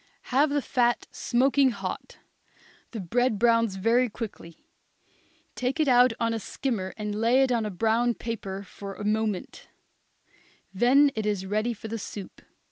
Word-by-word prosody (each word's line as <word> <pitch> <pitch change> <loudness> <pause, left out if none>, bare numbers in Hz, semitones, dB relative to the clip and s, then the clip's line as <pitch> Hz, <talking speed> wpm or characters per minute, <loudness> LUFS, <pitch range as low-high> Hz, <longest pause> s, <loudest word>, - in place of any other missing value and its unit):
Have 285 +4 +4
the 290 -1 0
fat 240 -2 +1
smoking 265 +2 +2
hot; 195 -5 -6 0.7
the 225 - -6
bread 225 +5 0
browns 230 -2 +3
very 230 +6 +2
quickly; 205 -7 -8 0.9
take 255 +5 -2
it 310 - +2
out 250 -1 +6
on 230 0 0
a 225 - -2
skimmer 215 -4 -3
and 210 -1 -3
lay 245 +4 +4
it 265 - +1
on 230 -3 +1
a - - -3
brown 225 +5 +1
paper 200 -4 -5
for 195 0 -9
a 205 - -7
moment; 215 -2 -2 1.1
then 270 +8 +5
it 215 -1 -3
is 200 -2 -1
ready 215 +4 -1
for 220 - -8
the 225 +1 -4
soup. 200 -1 -8
230 Hz, 155 wpm, -26 LUFS, 205-250 Hz, 1.1 s, out